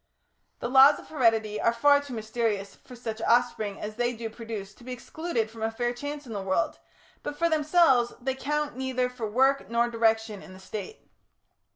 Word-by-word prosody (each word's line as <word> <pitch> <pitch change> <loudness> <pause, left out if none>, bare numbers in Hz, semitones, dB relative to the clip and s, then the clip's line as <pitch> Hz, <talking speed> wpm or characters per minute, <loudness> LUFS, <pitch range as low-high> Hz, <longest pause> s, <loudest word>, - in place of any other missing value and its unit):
The - - -1
laws 270 +3 +7
of - - -13
heredity 225 -7 +1
are 230 - +4
far 285 +5 +4
too 285 -3 -9
mysterious 220 -2 -2
for 250 - -14
such 225 -2 -6
offspring 230 -4 +1
as 215 +1 -6
they 240 0 +1
do 225 -1 -6
produce 220 -3 -7
to 240 - -18
be 255 - -7
excluded 250 -2 -3
from 225 -1 -11
a 220 - +1
fair 240 +2 -2
chance 285 +3 -6
in 230 - -7
the 200 - -3
world, 190 +4 0 0.4
but 290 - -5
for 335 - +2
themselves, 305 -5 +4
they 260 +1 -1
count 295 +1 -2
neither 255 -1 -1
for 235 -3 -4
work 265 -2 +2
nor 235 +1 +1
direction 225 -2 +1
in 185 - -12
the 185 - -12
State. 215 - -8
235 Hz, 195 wpm, -27 LUFS, 220-265 Hz, 0.4 s, laws